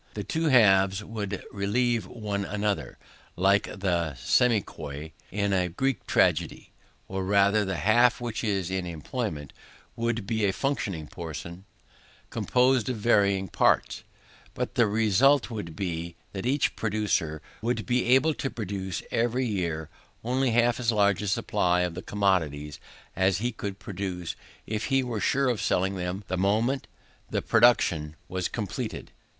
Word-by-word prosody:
The 105 - -3
two 160 +10 -2
halves 95 -7 +5
would 105 -2 -5
relieve 110 +1 0
one 105 -3 -3
another, 105 0 -2 0.4
like 100 +2 +3
the 85 -6 -1
semichori 80 -10 0 0.2
in 100 +1 0
a 90 -1 +2
Greek 130 +6 -2
tragedy; - - +1 0.4
or 95 0 -3
rather 100 +2 +3
the 95 -1 -2
half 120 +9 +4
which 120 -2 -3
was 95 -5 -1
in 95 -1 -2
employment 80 - -4 0.4
would 115 -2 -1
be 110 0 -1
a 100 -2 +2
fluctuating 100 - -2
portion, 85 +4 -8 0.7
composed 125 -1 +2
of 125 - -2
varying 100 -3 +2
parts; - - +1 0.5
but - - -3
the 115 - +3
result 115 +6 +3
would 100 -8 -6
be, 85 -2 -4 0.2
that 95 +4 -3
each 140 +2 +1
producer 105 -8 -1 0.2
would 120 +2 -1
be 125 0 +1
able 135 +6 +4
to 135 - -3
produce 95 -6 -4
every 120 +3 +1
year 85 -8 -2 0.4
only 130 +3 +1
half 120 +1 +2
as 120 -1 +2
large 100 -3 +2
a 105 - -3
supply 90 -2 +1
of 90 +1 -3
commodities, 80 -8 0 0.4
as 95 -1 +2
he 120 +4 -1
could 100 -3 -5
produce 95 -4 -5 0.3
if 110 0 -3
he 135 -1 +2
were 115 -4 -3
sure 135 0 +2
of 120 -4 0
selling 95 +2 +1
them 90 +2 -3
the 95 - -2
moment 110 +8 +1 0.4
the - - -1
production 85 -10 +3
was 95 -1 -2
completed. 105 -5 -5
100 Hz, 145 wpm, -27 LUFS, 90-120 Hz, 0.7 s, halves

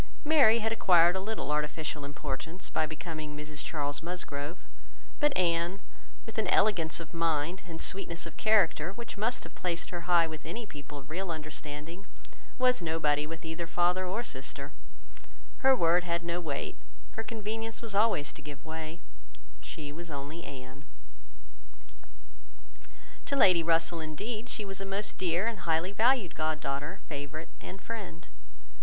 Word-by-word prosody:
Mary 285 -8 +7
had 225 -1 +1
acquired 175 -5 +6
a - - +1
little 205 -6 -2
artificial 150 0 -1
importance, 145 +4 -5
by 155 - +2
becoming 155 -1 -5
Mrs 150 0 -5
Charles 145 -2 -1
Musgrove; 165 -2 -3 0.6
but 295 0 +5
Anne, 170 +1 +2 0.5
with 225 -1 -4
an 220 - +1
elegance 175 -7 +3
of 165 0 -8
mind 165 +2 +1
and 165 -2 -6
sweetness 170 -3 -2
of 170 - -8
character, 190 -5 +4
which 235 +2 -7
must 225 +4 0
have - - -10
placed 170 -2 -2
her 175 0 -5
high 170 -1 +7
with 160 -1 -6
any 225 +8 -4
people 145 -5 -9
of 140 +1 -10
real 185 +3 -2
understanding, 155 +3 -5 0.5
was 250 -4 +4
nobody 150 -3 +2
with 165 +1 -7
either 160 +1 -3
father 175 +2 +3
or 205 +6 -1
sister; 140 - -4 0.9
her 265 0 +6
word 175 -4 +4
had 170 -1 -1
no 170 +1 -1
weight, 145 -5 -3 0.3
her 225 - -3
convenience 225 +1 -4
was 225 -3 -4
always 200 -8 +3
to - - -11
give 145 0 -9
way—she 155 - -8
was 170 +3 -7
only 145 +3 -5
Anne. 135 0 -9 2.4
To 280 - +1
Lady 185 -10 +7
Russell, 165 +1 +2
indeed, 210 +9 -4
she 210 - -3
was 195 0 -4
a - - -1
most 195 +2 -2
dear 180 +2 +2
and 230 -3 -1
highly 170 +1 +1
valued 225 -2 +3
god 155 0 0
daughter, 145 +5 -3
favourite, 150 +2 -5
and 190 - -7
friend. 140 - -6
170 Hz, 155 wpm, -31 LUFS, 150-195 Hz, 2.4 s, Mary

